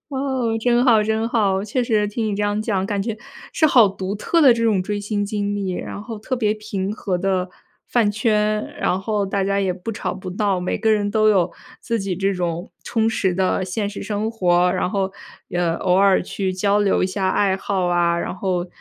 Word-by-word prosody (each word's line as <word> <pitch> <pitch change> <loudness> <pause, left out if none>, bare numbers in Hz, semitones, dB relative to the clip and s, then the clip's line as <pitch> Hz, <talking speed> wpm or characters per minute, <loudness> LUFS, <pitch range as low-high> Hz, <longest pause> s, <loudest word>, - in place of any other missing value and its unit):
哦， 265 -5 -1
真 245 +1 +3
好 225 -4 +5
真 220 +1 0
好。 200 -5 +1
确 245 +4 -1
实 215 -3 +1
听 220 +1 -2
你 210 - -1
这 205 - -2
样 205 +1 0
讲， 195 -4 -1
感 200 -1 -1
觉 220 +1 -3 0.4
是 315 - +3
好 245 -7 +6
独 190 0 -4
特 335 +10 +1
的 275 -5 +8
这 230 - -2
种 205 -5 +2
追 205 +2 -3
星 205 0 -2
经 205 0 -2
历。 195 -2 -2
然 200 - -6
后 225 -1 -7
特 255 +5 -3
别 215 -3 +1
平 205 -3 -4
和 185 -5 -2
的 185 -1 -1 0.4
饭 230 -4 +2
圈， 215 0 +1
然 185 - +1
后 205 0 -1
大 195 0 -1
家 200 0 +1
也 190 -2 0
不 190 +5 -6
吵 - - -3
不 185 -1 -7
闹， 200 -3 +1
每 180 - -2
个 220 +1 +2
人 205 -1 +1
都 215 0 +3
有 180 -5 +2 0.3
自 230 -2 -2
己 195 -1 -2
这 195 +1 0
种 175 0 -3
充 225 -1 0
实 190 -4 0
的 190 0 +1
现 200 +3 -2
实 205 - -7
生 215 +1 -2
活。 180 -4 +2
然 180 - 0
后， 195 0 -1 0.4
呃， 175 -2 0
偶 180 - 0
尔 195 0 +4
去 190 +1 -3
交 200 +2 +1
流 205 -2 +2
一 185 - +3
下 190 0 -1
爱 195 0 +2
好 190 -2 -1
啊， 170 -1 +2
然 - - -3
后 185 -2 -2
205 Hz, 235 characters per minute, -21 LUFS, 190-220 Hz, 0.4 s, 的